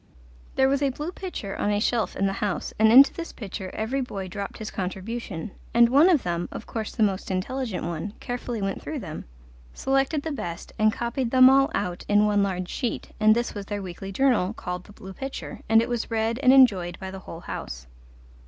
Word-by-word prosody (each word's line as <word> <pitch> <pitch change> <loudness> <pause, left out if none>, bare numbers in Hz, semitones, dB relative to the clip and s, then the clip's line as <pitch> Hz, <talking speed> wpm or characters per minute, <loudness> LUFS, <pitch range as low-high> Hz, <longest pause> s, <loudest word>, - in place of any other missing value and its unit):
There 265 - +4
was 275 +1 +1
a 280 - +3
blue 295 +6 -5
pitcher 360 - -6
on - - 0
a 205 0 +1
shelf 230 +1 0
in 195 - 0
the 195 - +1
house, 205 -3 -2
and 220 0 +6
into 270 +4 +8
this 335 0 -6
pitcher 195 -3 -6
every 240 +6 -1
boy 195 -7 -5
dropped 200 +2 -5
his 215 - -6
contribution, 195 0 -5 0.2
and 235 0 +7
one 290 +8 +6
of 325 -8 +3
them 175 0 -2
of - - -7
course 220 -2 -5
the 225 - +2
most 195 -2 0
intelligent 205 +2 -2
one 170 +4 -4
carefully 245 -3 -4
went 195 0 -2
through 310 - -5
them, 170 - -7 0.5
selected 270 +2 +1
the 320 - -3
best, 175 - -6
and 215 0 +5
copied 235 +2 -2
them 255 +1 +7
all 270 0 +4
out 180 -1 -2
in 205 0 +5
one 205 -1 +3
large 185 -2 -1
sheet, 240 +5 -3
and 215 0 +6
this 240 +1 -1
was 200 -2 -7
their 205 -1 -4
weekly 190 +2 -7
journal 230 -4 +2
called 180 -3 -5
The - - -14
Blue 190 -1 -10
Pitcher, 270 +6 -6
and 225 +1 +6
it - - -3
was 240 -2 -2
read 225 +1 0
and 260 -2 +5
enjoyed 195 -10 +5
by 190 -1 -7
the 190 - -7
whole 170 -3 -9
house. - - -6
215 Hz, 215 wpm, -25 LUFS, 190-255 Hz, 0.5 s, into